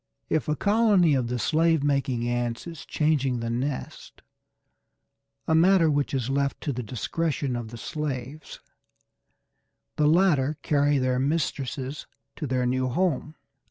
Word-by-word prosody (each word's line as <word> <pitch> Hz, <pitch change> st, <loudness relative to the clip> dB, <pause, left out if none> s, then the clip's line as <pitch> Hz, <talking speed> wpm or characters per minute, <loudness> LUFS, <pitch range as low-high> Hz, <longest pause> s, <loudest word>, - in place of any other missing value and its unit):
If 155 Hz, -, 0 dB
a 150 Hz, -, +1 dB
colony 205 Hz, -, +3 dB
of 130 Hz, -3 st, +1 dB
the 125 Hz, +1 st, -2 dB
slave 160 Hz, +5 st, +2 dB
making 135 Hz, -4 st, 0 dB
ants 120 Hz, -1 st, -2 dB
is 165 Hz, -3 st, -9 dB
changing 140 Hz, -5 st, +1 dB
the 115 Hz, 0 st, -3 dB
nest, 130 Hz, +3 st, -5 dB, 1.2 s
a 160 Hz, -, +2 dB
matter 165 Hz, 0 st, +5 dB
which 145 Hz, -1 st, 0 dB
is 125 Hz, -3 st, -1 dB
left 140 Hz, +1 st, -1 dB
to 145 Hz, -, -2 dB
the 125 Hz, -, -4 dB
discretion 135 Hz, +4 st, -2 dB
of 120 Hz, -2 st, -4 dB
the 120 Hz, +2 st, -9 dB
slaves, 145 Hz, 0 st, -5 dB, 1.4 s
the 150 Hz, -, +3 dB
latter 155 Hz, -4 st, +3 dB
carry 145 Hz, -1 st, +2 dB
their 130 Hz, -1 st, +1 dB
mistresses 140 Hz, -1 st, -2 dB, 0.3 s
to 150 Hz, -, -4 dB
their 125 Hz, -1 st, 0 dB
new 130 Hz, +1 st, 0 dB
home. 155 Hz, +1 st, -1 dB
140 Hz, 140 wpm, -26 LUFS, 125-155 Hz, 1.4 s, matter